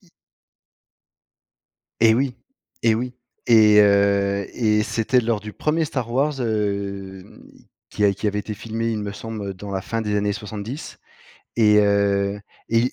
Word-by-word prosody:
Y 185 Hz, -, -26 dB, 1.9 s
Et 110 Hz, -1 st, +6 dB
oui 130 Hz, +1 st, 0 dB, 0.5 s
et 115 Hz, -1 st, +4 dB
oui, 125 Hz, +3 st, -3 dB, 0.3 s
et 110 Hz, -3 st, +6 dB
heu, 100 Hz, -1 st, +3 dB
et 105 Hz, -3 st, +2 dB
c'était 120 Hz, +4 st, +1 dB
lors 115 Hz, -2 st, -1 dB
du 105 Hz, 0 st, -8 dB
premier 155 Hz, +6 st, 0 dB
Star 130 Hz, -6 st, -4 dB
Wars, 135 Hz, +2 st, 0 dB
hem, 100 Hz, -3 st, -3 dB, 0.5 s
qui 105 Hz, -, -1 dB
a 100 Hz, -, +4 dB
qui 105 Hz, -, -4 dB
avait 105 Hz, 0 st, 0 dB
été 105 Hz, +1 st, -5 dB
filmé, 115 Hz, +2 st, -4 dB
il 110 Hz, -2 st, -2 dB
me 100 Hz, -1 st, -4 dB
semble, 110 Hz, -2 st, -6 dB
heu, -, -, -3 dB
dans 100 Hz, +2 st, -9 dB
la 95 Hz, -1 st, -3 dB
fin 115 Hz, +4 st, -3 dB
des 105 Hz, -2 st, -1 dB
années 105 Hz, 0 st, 0 dB
70, 110 Hz, +6 st, -7 dB, 0.6 s
et 105 Hz, -2 st, +5 dB
heu, 100 Hz, 0 st, +1 dB, 0.3 s
et 115 Hz, -, +3 dB
105 Hz, 160 wpm, -22 LUFS, 100-115 Hz, 1.9 s, Et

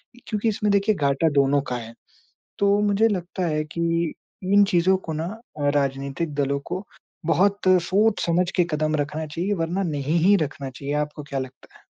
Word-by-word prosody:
इ -, -, -16 dB
क्योंकि 215 Hz, +1 st, 0 dB
इसमें 210 Hz, -1 st, 0 dB
देखिए 200 Hz, +1 st, +3 dB
घाटा 140 Hz, 0 st, +2 dB
दोनों 140 Hz, +1 st, +3 dB
का 125 Hz, -, -1 dB
है, 115 Hz, -1 st, -8 dB, 0.7 s
तो 200 Hz, 0 st, +3 dB
मुझे 210 Hz, +2 st, +3 dB
लगता 185 Hz, -3 st, -2 dB
है 155 Hz, -1 st, 0 dB
कि 165 Hz, +1 st, -1 dB, 0.4 s
इन 205 Hz, 0 st, +7 dB
चीज़ों 180 Hz, +2 st, +4 dB
को 160 Hz, -, -2 dB
ना 160 Hz, +2 st, -2 dB, 0.5 s
राजनीतिक 140 Hz, +2 st, -1 dB
दलों 140 Hz, -1 st, 0 dB
को 185 Hz, +3 st, -2 dB, 0.4 s
बहुत 195 Hz, +5 st, +2 dB, 0.2 s
सोच-समझ 185 Hz, -3 st, +2 dB
के 180 Hz, -, +4 dB
कदम 155 Hz, 0 st, 0 dB
रखना 150 Hz, +2 st, -2 dB
चाहिए, 175 Hz, +7 st, -2 dB
वरना 175 Hz, +1 st, -1 dB
नहीं 150 Hz, -1 st, -1 dB
ही 200 Hz, +3 st, +6 dB
रखना 140 Hz, -1 st, -7 dB
चाहिए, 140 Hz, +2 st, -5 dB
आपको 150 Hz, 0 st, -3 dB
क्या 140 Hz, -1 st, -4 dB
लगता 130 Hz, 0 st, -9 dB
है? -, -, -19 dB
165 Hz, 175 wpm, -24 LUFS, 145-195 Hz, 0.7 s, इन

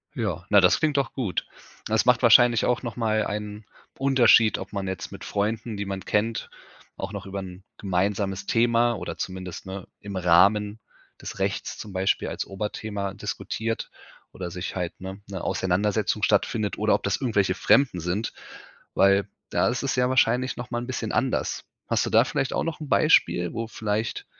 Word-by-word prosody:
Ja. 95 Hz, -, -3 dB
Na, 100 Hz, -1 st, +6 dB
das 90 Hz, -, +4 dB
klingt 150 Hz, -2 st, +1 dB
doch 140 Hz, -, 0 dB
gut. 115 Hz, -9 st, -2 dB, 0.4 s
Das 110 Hz, +1 st, +1 dB
macht 125 Hz, 0 st, +4 dB
wahrscheinlich 120 Hz, 0 st, +6 dB
auch 125 Hz, -, +1 dB
noch 120 Hz, -3 st, -5 dB
mal 110 Hz, -3 st, +1 dB
einen 105 Hz, 0 st, -5 dB, 0.3 s
Unterschied, 130 Hz, -5 st, +5 dB
ob -, -, -8 dB
man 100 Hz, -1 st, -3 dB
jetzt 95 Hz, -1 st, -5 dB
mit -, -, -9 dB
Freunden, 110 Hz, +1 st, -2 dB
die 100 Hz, -, -3 dB
man 95 Hz, -1 st, -5 dB
kennt, 115 Hz, +2 st, -1 dB, 0.5 s
auch 95 Hz, -, -5 dB
noch 100 Hz, +1 st, -6 dB
über 100 Hz, 0 st, -5 dB
'n 95 Hz, 0 st, -9 dB
gemeinsames 95 Hz, 0 st, -1 dB
Thema 120 Hz, 0 st, +3 dB
oder -, -, -6 dB
zumindest, 95 Hz, -1 st, -6 dB
ne, 95 Hz, -1 st, -7 dB
im 100 Hz, -1 st, -8 dB
Rahmen 100 Hz, +4 st, +3 dB, 0.4 s
des -, -, -7 dB
Rechts -, -, -2 dB
zum 105 Hz, -, -8 dB
Beispiel 95 Hz, +1 st, 0 dB
als -, -, -4 dB
Oberthema 100 Hz, 0 st, -4 dB
diskutiert 105 Hz, +2 st, -4 dB, 0.4 s
oder 90 Hz, -1 st, -6 dB
sich 90 Hz, +1 st, -5 dB
halt, 90 Hz, -2 st, -4 dB
ne, 95 Hz, +2 st, -8 dB
'ne 95 Hz, -3 st, -6 dB
Auseinandersetzung 105 Hz, +3 st, 0 dB
stattfindet 105 Hz, 0 st, +1 dB
oder 110 Hz, 0 st, +3 dB
ob -, -, -4 dB
das 100 Hz, 0 st, 0 dB
irgendwelche 105 Hz, -7 st, +1 dB
Fremden 125 Hz, -2 st, +3 dB
sind, 90 Hz, +7 st, -2 dB, 0.6 s
weil 100 Hz, +1 st, +4 dB, 0.2 s
da -, -, +2 dB
ist 125 Hz, +3 st, -2 dB
es 135 Hz, -, 0 dB
ja 125 Hz, 0 st, +2 dB
wahrscheinlich 130 Hz, 0 st, +2 dB
noch 120 Hz, 0 st, -7 dB
mal 120 Hz, -, -1 dB
'n 120 Hz, -, -7 dB
bisschen 115 Hz, -4 st, -3 dB
anders. 125 Hz, +4 st, -1 dB, 0.2 s
Hast -, -, +1 dB
du -, -, -2 dB
da -, -, +5 dB
vielleicht 135 Hz, -, -2 dB
auch -, -, 0 dB
noch 165 Hz, -2 st, -4 dB
'n 150 Hz, -3 st, -7 dB
Beispiel, 90 Hz, -, +3 dB
wo 115 Hz, 0 st, -3 dB
vielleicht 110 Hz, 0 st, -3 dB
105 Hz, 180 wpm, -25 LUFS, 95-115 Hz, 0.6 s, Na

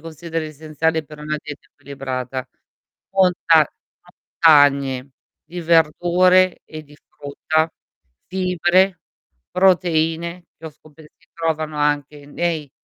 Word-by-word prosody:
consideri 165 Hz, 0 st, -6 dB
essenziali 155 Hz, +1 st, -2 dB
per 150 Hz, +1 st, -13 dB
una 150 Hz, +1 st, -3 dB
dieta 150 Hz, -2 st, -10 dB
equilibrata? 130 Hz, -2 st, -6 dB, 0.7 s
Monta 175 Hz, -5 st, +3 dB, 0.7 s
montagne 140 Hz, -4 st, +4 dB, 0.3 s
di 175 Hz, +2 st, -8 dB
verdure 175 Hz, +3 st, +3 dB
e 155 Hz, 0 st, -9 dB
di 150 Hz, 0 st, -19 dB
frutta, 155 Hz, +3 st, -2 dB, 0.6 s
fibre, 185 Hz, 0 st, +1 dB, 0.5 s
proteine, 170 Hz, -2 st, +1 dB
che 160 Hz, -, -10 dB
ho -, -, -7 dB
scope 155 Hz, +1 st, -19 dB, 0.2 s
si -, -, -30 dB
trovano 160 Hz, -2 st, -2 dB
anche 145 Hz, 0 st, -1 dB
nei 155 Hz, -1 st, -3 dB
160 Hz, 105 wpm, -20 LUFS, 145-170 Hz, 0.7 s, montagne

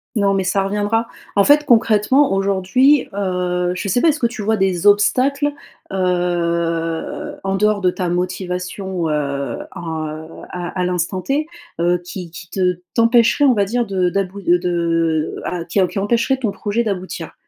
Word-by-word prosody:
Non, 200 Hz, -2 st, +2 dB
mais 190 Hz, -1 st, +1 dB
ça 195 Hz, +1 st, +1 dB
reviendra. 210 Hz, +3 st, 0 dB, 0.3 s
En 200 Hz, -, +5 dB
fait, 295 Hz, +5 st, +5 dB
concrètement, 230 Hz, +2 st, +3 dB
aujourd'hui, 200 Hz, +9 st, +3 dB
heu, 180 Hz, -2 st, -1 dB
je 200 Hz, -, -4 dB
sais 220 Hz, +6 st, +1 dB
pas, 335 Hz, -, +4 dB
est-ce 300 Hz, -, 0 dB
que 235 Hz, -, +1 dB
tu 230 Hz, -2 st, -2 dB
vois 220 Hz, +1 st, +1 dB
des 190 Hz, -1 st, +1 dB
obstacles, 270 Hz, +8 st, +3 dB, 0.4 s
heu, 170 Hz, -3 st, -1 dB
en 195 Hz, 0 st, -1 dB
dehors 210 Hz, +1 st, +2 dB
de 180 Hz, -1 st, +3 dB
ta 180 Hz, -1 st, -3 dB
motivation, 180 Hz, 0 st, -3 dB
heu, 140 Hz, -4 st, -2 dB, 0.2 s
en, 160 Hz, -2 st, -4 dB
heu, 155 Hz, +1 st, -7 dB, 0.2 s
à 180 Hz, +1 st, -5 dB
à 180 Hz, -, +1 dB
l'instant 180 Hz, +1 st, -1 dB
T, 290 Hz, +7 st, -1 dB, 0.3 s
heu, 175 Hz, +1 st, +2 dB
qui 180 Hz, -1 st, -7 dB
qui 175 Hz, +1 st, -10 dB
te 180 Hz, -2 st, 0 dB, 0.2 s
t'empêcherait, 235 Hz, +4 st, +4 dB
on 260 Hz, -, +5 dB
va 205 Hz, -3 st, +2 dB
dire, 240 Hz, +4 st, 0 dB
de 185 Hz, -3 st, 0 dB
d'about 195 Hz, +1 st, -2 dB
heu, 175 Hz, +1 st, +5 dB
de, 180 Hz, -, -4 dB, 0.7 s
heu, -, -, -8 dB
ah, 175 Hz, -2 st, -3 dB
qui 180 Hz, -, -1 dB
em 185 Hz, -, +4 dB
qui 195 Hz, -, -4 dB
empêcherait 235 Hz, +6 st, +1 dB
ton 230 Hz, -6 st, -1 dB
projet 215 Hz, +4 st, -1 dB
d'aboutir? 190 Hz, -4 st, -4 dB
190 Hz, 180 wpm, -19 LUFS, 180-220 Hz, 0.7 s, En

